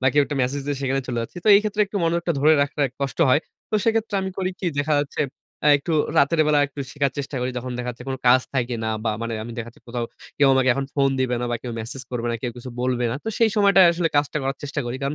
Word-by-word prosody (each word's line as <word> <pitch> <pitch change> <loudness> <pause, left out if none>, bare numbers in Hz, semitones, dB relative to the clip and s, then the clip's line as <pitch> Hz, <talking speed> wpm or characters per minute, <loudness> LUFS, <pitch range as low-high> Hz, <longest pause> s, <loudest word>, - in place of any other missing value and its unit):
বা 130 - +1
কেউ 145 - +4
একটা 145 - -4
মেসেজ 140 +3 -1
দিয়ে 145 - -1
সেখানে 135 0 0
চলে 120 -1 -2
যাচ্ছি, 115 - -9
তো - - +2
এই 200 - +7
ক্ষেত্রে 210 0 -2
একটু 200 - -6
মনোযোগটা 170 +1 +1
ধরে 155 +2 +6
রাখাটা 145 +1 -2 0.2
কষ্ট 140 +2 -3
হয়। 135 +4 +4 0.3
তো - - -2
সেক্ষেত্রে 225 -2 +1
আমি 190 - -3
করি 185 -1 0
কি 185 - -2
দেখা 150 +1 +1
যাচ্ছে, 145 - -4 0.4
এ্যা 150 - +5
একটু 165 +4 -4 0.3
রাতের 155 +3 +3
বেলা 150 -1 +4
একটু 140 0 -9
শেখার 140 -3 0
চেষ্টা 140 0 -4
করি 125 +1 -1
যখন 125 0 -5
দেখা 125 - -3
যাচ্ছে 120 +1 -10
কোনো 130 -1 -3
কাজ 130 +1 +7
থাকে 120 -1 0
না 110 - 0
বা 110 - +2
মানে 115 - -3
আমি 120 - -7
দেখা 120 0 -4
যাচ্ছে, 120 - -17
কোথাও 120 0 -2 0.3
কেউ 140 -2 +5
আমাকে 130 -1 +3
এখন 135 - -2
ফোন 140 -1 +3
দিবে 130 -1 +1
না - - -1
বা 120 - 0
কেউ 120 -2 -5
মেসেজ 125 +4 -7
করবে 120 -1 -3
না, - - -1
কেউ 125 - -1
কিছু 125 +1 -8
বলবে 125 -1 0
না, - - -2
তো - - -2
সেই 230 -1 +4
সময়টায় 200 -3 +6
আসলে 170 -1 0
কাজটা 145 +1 +1
করার 135 +1 -2
চেষ্টা 145 0 -3
করি। 120 - -3
কারণ 140 +2 -1
140 Hz, 275 wpm, -23 LUFS, 125-155 Hz, 0.4 s, এই